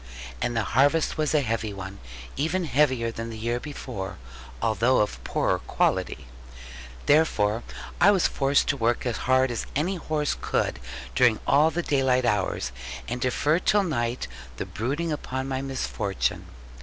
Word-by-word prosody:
And 120 Hz, -1 st, 0 dB
the 115 Hz, -, +2 dB
harvest 145 Hz, +9 st, +2 dB
was 155 Hz, 0 st, +1 dB
a 150 Hz, -, +4 dB
heavy 110 Hz, -3 st, -1 dB
one, 95 Hz, 0 st, -7 dB, 0.4 s
even 165 Hz, +5 st, 0 dB
heavier 130 Hz, -5 st, +2 dB
than 115 Hz, 0 st, -5 dB
the 115 Hz, -, -7 dB
year 120 Hz, +2 st, -1 dB
before, 120 Hz, -10 st, -6 dB, 0.4 s
although 115 Hz, +3 st, +2 dB
of 105 Hz, -, 0 dB
poorer -, -, 0 dB
quality. 65 Hz, -, 0 dB, 0.8 s
Therefore 120 Hz, -8 st, +3 dB, 0.4 s
was 195 Hz, -1 st, +5 dB
I -, -, +4 dB
forced 140 Hz, 0 st, +2 dB
to 145 Hz, -, +1 dB
work 120 Hz, 0 st, +1 dB
as 120 Hz, -2 st, -1 dB
hard 130 Hz, 0 st, +4 dB
as 120 Hz, -, -3 dB
any 175 Hz, +7 st, 0 dB
horse 155 Hz, -3 st, -1 dB
could -, -, 0 dB, 0.3 s
during 120 Hz, -4 st, +4 dB
all 150 Hz, +3 st, +5 dB
the 170 Hz, +2 st, -2 dB
daylight 130 Hz, -4 st, +2 dB
hours, 95 Hz, -, 0 dB, 0.4 s
and 125 Hz, +2 st, -4 dB
defer 145 Hz, +6 st, +2 dB
till 205 Hz, +2 st, +3 dB
night 120 Hz, -8 st, -1 dB, 0.3 s
the -, -, -3 dB
brooding 145 Hz, +9 st, -2 dB
upon 130 Hz, -3 st, -3 dB
my 130 Hz, -1 st, -2 dB
misfortune. 130 Hz, -7 st, -2 dB
130 Hz, 155 wpm, -26 LUFS, 115-150 Hz, 0.8 s, was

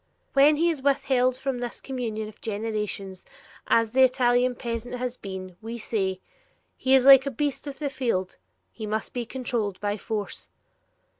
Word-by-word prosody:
When 285 Hz, +2 st, +6 dB
he 335 Hz, +3 st, +2 dB
is 300 Hz, -5 st, -5 dB
withheld 260 Hz, -2 st, +2 dB
from 265 Hz, -1 st, -3 dB
this 240 Hz, -1 st, -5 dB
Communion 220 Hz, -5 st, -4 dB
for 215 Hz, -, -28 dB
generations, 210 Hz, -3 st, -3 dB, 0.4 s
as 230 Hz, -1 st, +3 dB
the 265 Hz, +2 st, +3 dB
Italian 250 Hz, -1 st, +3 dB
peasant 235 Hz, +1 st, -4 dB
has 250 Hz, 0 st, -3 dB
been, 190 Hz, -4 st, -8 dB
we 230 Hz, +2 st, -6 dB
say, 190 Hz, -4 st, -2 dB, 0.5 s
'He 265 Hz, 0 st, +3 dB
is 260 Hz, -1 st, +4 dB
like 270 Hz, 0 st, +9 dB
a -, -, +2 dB
beast 285 Hz, +2 st, -2 dB
of 275 Hz, -1 st, -6 dB
the 290 Hz, -3 st, -3 dB
field; 230 Hz, -9 st, -2 dB, 0.3 s
he 215 Hz, -, -7 dB
must 215 Hz, +1 st, -3 dB
be 240 Hz, -2 st, -3 dB
controlled 235 Hz, -6 st, -3 dB
by 205 Hz, +1 st, -1 dB
force.'" 210 Hz, -1 st, -4 dB
240 Hz, 165 wpm, -26 LUFS, 215-265 Hz, 0.5 s, like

